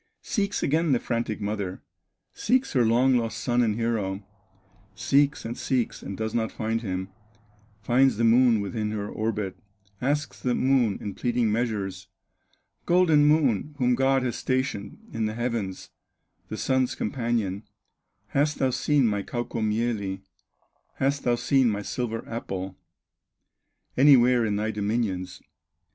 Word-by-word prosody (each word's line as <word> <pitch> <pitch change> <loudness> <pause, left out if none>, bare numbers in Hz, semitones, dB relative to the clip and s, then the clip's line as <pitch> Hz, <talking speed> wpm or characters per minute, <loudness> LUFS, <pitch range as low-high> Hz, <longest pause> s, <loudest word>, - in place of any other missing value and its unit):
Seeks 205 -4 -1
again 155 +1 +2
the 125 - +2
frantic 115 -3 -2
mother, 100 -3 -4 0.5
Seeks 255 +4 +1
her 125 -4 +4
long 125 +3 +4
lost 115 -2 -2
son 120 +1 +1
and 110 -3 +1
hero, 105 -4 -2 0.7
Seeks, 140 +5 +2
and 115 +1 -4
seeks, 125 -3 -1
and 100 - -6
does 110 0 -3
not 115 -1 0
find 115 0 -2
him; 95 -3 -4 0.7
Finds 130 0 +3
the 115 - 0
Moon 115 -1 +5
within 105 +1 -3
her 105 -1 -3
orbit, 105 -3 -3 0.4
Asks 145 +3 -1
the 125 -1 0
Moon 130 -6 +2
in 100 - -5
pleading 120 -1 0
measures: 105 -5 -2 0.8
"Golden 170 -4 +5
Moon, 150 -3 +2
whom 125 -2 +2
God 135 +1 +2
has 125 -2 -1
stationed 130 -6 -2 0.2
In 110 -1 -1
the 110 - -4
heavens, 115 -6 -3 0.6
the - - -5
Sun's 130 -1 +1
companion, 110 -4 -1 0.7
Hast 145 +1 +1
thou 130 -1 +1
seen 145 +1 +2
my 105 -2 +1
Kaukomieli, 110 -3 -2 0.7
Hast 140 +1 0
thou 120 -1 +3
seen 130 0 +2
my 105 -1 -2
silver 115 0 -4
apple, 95 -5 -5 1.2
Anywhere 125 -4 +5
in 105 - 0
thy 110 +2 -1
dominions?" 100 -4 -2
115 Hz, 135 wpm, -26 LUFS, 105-130 Hz, 1.2 s, Moon